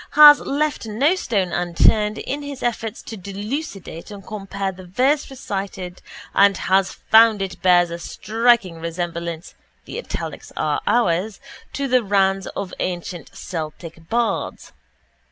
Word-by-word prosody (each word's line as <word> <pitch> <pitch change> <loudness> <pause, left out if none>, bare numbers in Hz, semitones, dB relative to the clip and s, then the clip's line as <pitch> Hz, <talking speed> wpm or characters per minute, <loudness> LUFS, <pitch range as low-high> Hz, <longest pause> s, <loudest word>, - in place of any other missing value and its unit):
has 295 0 +10
left 290 -3 -1
no 260 +10 +2
stone 205 - -1
unturned 210 +5 +2
in 285 +2 -4
his 285 -2 -7
efforts 230 -2 -2
to 225 - -7
delucidate 200 - -6
and 200 -2 -10
compare 195 -2 -4
the 185 0 -12
verse 270 +11 +1
recited 195 -7 -5 0.3
and 200 -1 +5
has 190 0 +2
found 220 -1 +5
it 195 -2 -5
bears 175 -2 +4
a 170 - -5
striking 215 -2 +1
resemblance 170 0 -4 0.3
(the - - -6
italics - - -6
are - - 0
ours) 195 -2 +1 0.3
to 280 0 -2
the 255 -1 +3
ranns 195 -1 +2
of 195 -2 -4
ancient 175 -3 -4
Celtic 165 0 -7
bards. 230 -3 -1
200 Hz, 135 wpm, -21 LUFS, 180-235 Hz, 0.3 s, has